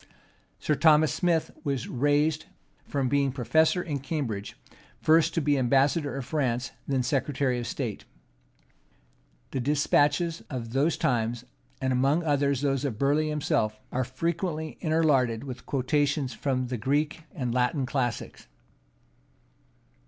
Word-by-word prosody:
Sir 150 - 0
Thomas 155 -2 +4
Smith 170 -3 +1
was 140 -5 -2
raised 145 +4 +1 0.4
from 135 -2 -1
being 140 0 +2
professor 160 +7 +2
in 145 -4 -3
Cambridge, 130 -8 -4 0.4
first 160 +1 +3
to 165 - +2
be 145 -1 +2
ambassador 140 +4 +2
to 135 - -3
France, 125 -3 -1 0.2
then 135 -2 +1
secretary 135 -1 0
of 120 - -4
state. 120 -7 -4 1.5
The 135 - -2
despatches 145 +3 +2
of 115 -3 -5
those 145 +5 +2
times, 120 0 0 0.3
and 130 -1 0
among 135 +7 +2
others 140 -3 +1
those 135 -2 0
of 130 -7 -2
Burleigh 145 +4 +2
himself, 110 -8 0
are 130 - 0
frequently 160 +4 -3
interlarded 140 -8 +2
with 125 -3 -8
quotations 140 0 0
from 130 -3 -1
the 125 - -2
Greek 145 +7 0
and 125 -3 -2
Latin 125 +3 +1
classics. 125 -3 -3
140 Hz, 130 wpm, -27 LUFS, 125-150 Hz, 1.5 s, Thomas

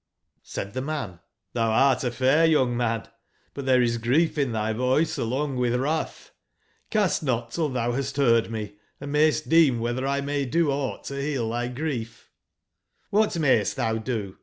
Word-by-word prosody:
J§ - - -61 0.4
Said 100 - -6
the 130 - -2
man: 145 -5 -3
'^ 90 -2 -18 0.3
thou 115 -1 +1
art 130 +3 +3
a 125 - +1
fair 130 +6 +3
young 140 -7 +3
man: 115 -2 -1 0.5
but 140 -1 -6
there 130 -1 +4
is 120 -1 0
grief 140 +9 +2
in 140 -5 0
thy 110 0 -1
voice 130 +7 +1
along 130 +3 -1
with 125 -1 +1
wrath 150 +6 -2
J9 - - -43
Cast 210 -5 +1
not 120 -5 -1
till 155 +2 -1
thou 120 -2 -1
hast 135 +2 -3
heard 115 -5 +3
me, 105 -2 -6 0.2
and 140 0 -6
mayst 155 0 +2
deem 160 -6 +5
whether 120 +3 -2
1 140 0 -1
may 145 0 -1
do 155 +3 +1
aught 135 -1 -3
to 140 0 -5
heal 135 -6 -2
thy 120 +1 -2
grief" 125 -4 -5 0.8
j^''<nhat 210 -4 +2
mayst 130 -8 +2
thou 110 0 -1
do?" 110 -5 -4
130 Hz, 185 wpm, -25 LUFS, 115-145 Hz, 0.8 s, deem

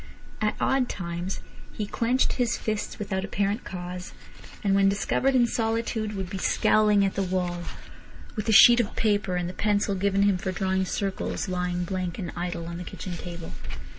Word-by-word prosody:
At 210 0 +1
odd 265 -2 +2
times 175 +1 -4 0.3
he 210 - -3
clenched 240 +5 +1
his 245 -2 0
fists 215 -1 -3
without 190 -2 -2
apparent 200 +3 -1
cause, 180 0 -6 0.5
and 200 -2 +2
when 195 0 +5
discovered 260 +6 +1
in 245 -2 +5
solitude 225 -2 -1
would 190 -2 -3
be 190 +1 -5
scowling 210 -1 +4
at 195 - 0
the 195 - -1
wall, 180 -2 -1 0.7
with 215 -1 -3
the - - +3
sheet 235 +3 +9
of 215 - -1
paper 205 -4 +1
and 175 -1 -1
the 180 - -5
pencil 205 +1 +1
given 200 +1 +2
him 200 -2 +3
for 190 0 -2
drawing 190 0 0
circles 195 +2 -2
lying 180 -1 -1
blank 180 -1 -3
and 180 -5 -4
idle 175 -1 -3
on 170 0 -5
the - - -5
kitchen 180 +1 -6
table. 170 -1 -7
195 Hz, 180 wpm, -26 LUFS, 180-215 Hz, 0.7 s, sheet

